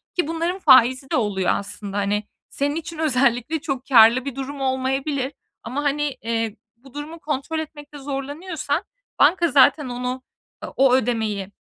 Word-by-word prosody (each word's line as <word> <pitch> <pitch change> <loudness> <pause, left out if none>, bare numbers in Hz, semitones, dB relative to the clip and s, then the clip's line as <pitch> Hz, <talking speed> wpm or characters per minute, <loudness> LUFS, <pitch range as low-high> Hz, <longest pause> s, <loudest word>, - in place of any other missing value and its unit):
ki 350 -4 0
bunların 335 +3 -2
faizi 260 -3 +5
de - - +2
oluyor, 200 -5 +1
aslında. 200 0 -5
Hani, 205 +1 0 0.3
senin 285 +1 -1
için 330 0 -6
özellikle 275 -1 +1
çok 270 -3 -4
kârlı 240 0 +6
bir 275 -3 -5
durum 275 +1 -6
olmayabilir. 265 +1 -1 0.3
Ama, 260 +6 -4
hani, 290 -1 -1
eee, 225 -1 -2 0.2
bu 260 +2 -18
durumu 300 +3 -7
kontrol 305 +1 -3
etmekte 295 -1 -9
zorlanıyorsan 290 +4 -4 0.4
banka 340 +4 +4
zaten 285 +1 +4
onu, 250 +1 -4 0.4
eee, - - -5
o 265 -1 +4
ödemeyi 220 -5 0
270 Hz, 150 wpm, -22 LUFS, 245-295 Hz, 0.4 s, kârlı